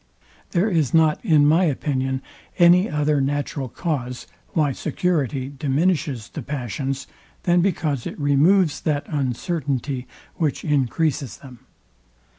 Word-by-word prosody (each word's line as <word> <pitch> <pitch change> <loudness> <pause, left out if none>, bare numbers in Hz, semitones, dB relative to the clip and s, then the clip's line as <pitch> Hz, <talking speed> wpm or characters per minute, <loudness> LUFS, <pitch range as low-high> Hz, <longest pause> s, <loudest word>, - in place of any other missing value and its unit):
There 185 +3 +1
is 165 - +1
not 160 -2 +3
in 155 -8 +4
my 165 +5 +4
opinion 130 -3 -1 0.3
any 180 +2 +6
other 150 -1 +1
natural 140 -1 -2
cause, 125 -5 -3 0.3
why 150 -4 +2
security 140 -3 -1
diminishes 145 - -1
the 155 - -6
passions, 135 +1 -4 0.4
than 175 0 +3
because 155 -8 -1
it - - -7
removes 150 +4 +3
that 145 -2 -1
uncertainty, 135 -2 -2 0.3
which 155 -5 -1
encreases 140 - 0
them. 130 -4 -13
145 Hz, 115 wpm, -22 LUFS, 135-160 Hz, 0.4 s, any